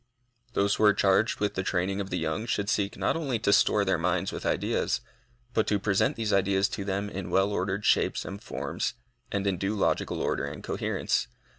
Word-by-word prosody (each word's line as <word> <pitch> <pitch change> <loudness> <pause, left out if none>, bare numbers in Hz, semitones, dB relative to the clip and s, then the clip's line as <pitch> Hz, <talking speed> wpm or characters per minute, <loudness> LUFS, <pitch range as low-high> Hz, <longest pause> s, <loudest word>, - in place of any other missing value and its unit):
Those 100 -2 +2
who - - 0
are 105 - +6
charged 100 +3 +3
with 105 0 0
the 95 - -1
training 95 +2 -1
of 95 - -5
the 90 - -1
young 80 +7 -2
should 100 -2 -1
seek 100 -2 0
not - - +1
only 140 -7 -1
to 100 -2 +2
store 100 0 +4
their 95 -3 +1
minds 85 +1 0
with - - -4
ideas, - - 0 0.5
but 110 - +1
to 105 - +2
present 100 -1 +1
these 110 -2 -1
ideas 100 0 +3
to 100 - -4
them 100 +1 -2
in 95 -3 -5
well 95 +2 +2
ordered 95 +1 -1
shapes - - +2
and 100 +2 -7
forms, - - -3 0.4
and 100 0 -1
in 95 -3 0
due 100 +3 -1
logical 100 - 0
order - - 0
and - - -7
coherence. - - -1
100 Hz, 205 wpm, -28 LUFS, 95-105 Hz, 0.5 s, are